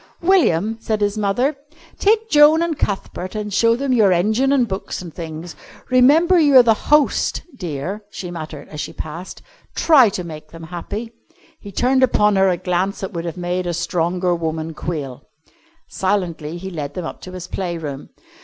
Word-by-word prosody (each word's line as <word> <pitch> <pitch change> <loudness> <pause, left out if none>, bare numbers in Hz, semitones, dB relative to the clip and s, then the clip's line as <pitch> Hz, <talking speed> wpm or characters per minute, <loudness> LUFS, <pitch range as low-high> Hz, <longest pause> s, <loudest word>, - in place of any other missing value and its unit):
"William," 225 - +3
said 215 -1 -1
his 205 0 0
mother, 215 +8 0 0.4
"take 440 +2 +3
Joan 305 -2 +6
and 335 -2 -1
Cuthbert 190 -4 -3
and 210 -1 -4
show 230 +3 +4
them 270 +1 -1
your 215 -6 +4
engine 215 +10 +2
and 260 -4 +3
books 190 -1 -4
and 175 -3 -9
things. 165 0 -7 0.4
Remember 310 +8 +5
you're 280 -5 +7
the 230 -2 +5
host, 295 +6 +1
dear," 180 - -5
she 180 -3 -7
murmured 155 -3 -7
as 150 -1 -5
he - - -7
passed. 165 +4 -8 0.3
"Try 275 -9 +6
to 185 -2 -4
make 155 -2 -9
them 165 +1 -11
happy." 190 +7 -6 0.5
He 200 - -10
turned 260 +6 +2
upon 210 -5 +3
her 190 0 +4
a 180 - +1
glance 185 +2 -1
that 190 - -5
would 170 -1 -4
have 170 +1 -5
made 180 0 -2
a 175 - -1
stronger 175 +1 0
woman 160 -1 -3
quail. 145 -6 -5 0.7
Silently 175 -5 -2
he 190 +2 -7
led 145 -4 -5
them 180 - -4
up - - -7
to 185 - -9
his 180 -1 -7
play 175 -3 -3
room. 145 -4 -7
190 Hz, 180 wpm, -20 LUFS, 170-235 Hz, 0.7 s, you're